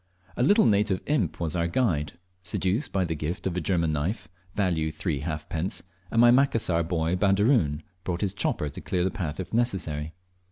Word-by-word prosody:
A - - -2
little 205 - +5
native 100 -3 +3
imp 135 - 0
was 85 -2 0
our 85 -1 +1
guide, 85 - 0 0.3
seduced 95 - -1
by 95 -2 +1
the 80 - -2
gift 75 +3 -4
of 95 -2 -1
a 90 - -1
German 85 -2 +1
knife, 80 +9 -2 0.3
value 85 -6 +1
three 80 -2 -2
halfpence, 80 +4 -3 0.3
and 115 - +1
my 120 0 +8
Macassar 115 -10 +3
boy 85 0 0
Baderoon 95 - +2 0.2
brought 90 -1 -2
his 100 -2 0
chopper 75 -6 -1
to - - -9
clear 90 -1 -1
the 95 - +1
path 85 -8 -4
if 95 +2 -6
necessary. 85 -10 -1
90 Hz, 185 wpm, -27 LUFS, 80-105 Hz, 0.3 s, my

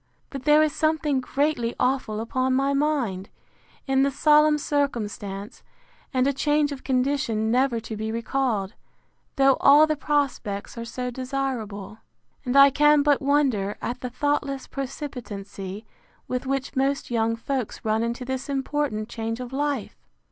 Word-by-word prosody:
But 270 -2 -7
there 300 +1 +6
is 305 -2 0
something 310 -3 +1
greatly 265 -3 -1
awful 250 -4 0
upon 255 +3 0
my 275 +1 +1
mind, 275 -10 0 0.6
in 270 -1 +2
the 275 - +3
solemn 300 +2 +4
circumstance, 215 -9 -3 0.5
and 255 -1 +2
a 280 - +2
change 295 +1 +1
of 275 -2 -7
condition 255 -4 0
never 250 -1 +2
to 220 - -6
be 220 +1 -3
recalled, 230 -3 -1 0.6
though 270 -2 +4
all 290 +2 +7
the 310 0 0
prospects 270 -9 -2
are 230 -1 -5
so 250 +2 -4
desirable. 240 -6 -4 0.4
And 255 0 0
I 275 0 +9
can 295 +1 +4
but 290 -1 +3
wonder 270 -8 +1
at 245 +1 -4
the 250 - -4
thoughtless 280 +1 -1
precipitancy 215 -8 -6 0.4
with 255 +1 -3
which 275 +1 -2
most 270 0 0
young 230 -1 +1
folks 245 0 -4
run 220 +1 +1
into 235 +2 -3
this 260 +2 -4
important 270 -5 -1
change 225 0 -4
of 250 0 -7
life! 285 -4 -2
260 Hz, 150 wpm, -25 LUFS, 230-280 Hz, 0.6 s, I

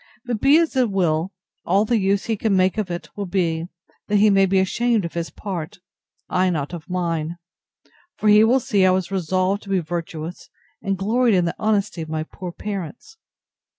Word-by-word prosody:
But 240 -3 -2
be 275 +2 +6
it - - +5
as 325 -4 -1
it 255 -3 +3
will, 175 -2 0 0.3
all 195 +5 +2
the 230 0 +1
use 195 +1 +1
he 225 - 0
can 205 -2 +1
make 185 +3 +2
of 205 -4 -2
it 175 0 -5
will 200 -2 -4
be, 170 -3 -1 0.4
that 210 - 0
he 205 +1 +5
may 195 -1 +4
be 190 +1 +2
ashamed 220 +2 +1
of 170 - -6
his 170 -1 -3
part; 180 -6 -6 0.5
I 185 0 +1
not 155 -2 -2
of 170 +1 -8
mine: 170 -2 -2 0.8
for 215 - -1
he 210 +1 +7
will 245 +4 +4
see 205 -5 +1
I 185 - +6
was 185 0 0
resolved 185 +2 0
to 200 - -13
be 195 - +2
virtuous, 165 0 -6 0.3
and 195 -2 -1
gloried 225 +4 +2
in 180 -2 +2
the 170 - -2
honesty 205 -5 0
of 160 - -6
my 155 0 -2
poor 180 +2 -8
parents. 205 - -7
190 Hz, 205 wpm, -22 LUFS, 175-210 Hz, 0.8 s, he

